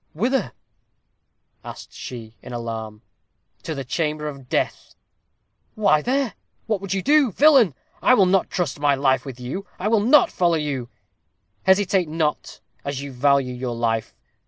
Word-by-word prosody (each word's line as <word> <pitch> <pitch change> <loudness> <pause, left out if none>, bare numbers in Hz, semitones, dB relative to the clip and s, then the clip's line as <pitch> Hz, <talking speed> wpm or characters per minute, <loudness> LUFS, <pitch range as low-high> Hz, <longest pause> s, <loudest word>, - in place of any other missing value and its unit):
"Whither?" 250 - 0 1.1
asked - - -10
she, 115 -3 -8
in 125 - -9
alarm. 110 -2 -6 0.6
"To 160 - -5
the 135 - -4
chamber 150 +2 -2
of 135 -4 -9
death!" - - -2 0.8
"Why 200 -8 +3
there? 260 - 0 0.3
what 215 -4 -1
would 195 - -6
you 190 - -2
do? 290 -4 +4
Villain! 260 - +5 0.3
I 255 - +5
will 195 - +5
not 190 +1 +2
trust 165 -5 -2
my 145 -1 +3
life 135 -1 +1
with 130 -2 -8
you. 140 +11 -5
I 190 - -2
will 225 -1 +4
not 295 - +5
follow 175 -2 +2
you." 140 -6 -3 0.8
"Hesitate 190 -3 +3
not, 155 -1 -2 0.2
as 140 -1 -4
you 140 - -7
value 135 0 +2
your 125 -1 -4
life. 115 -1 -1
150 Hz, 155 wpm, -22 LUFS, 130-200 Hz, 1.1 s, Villain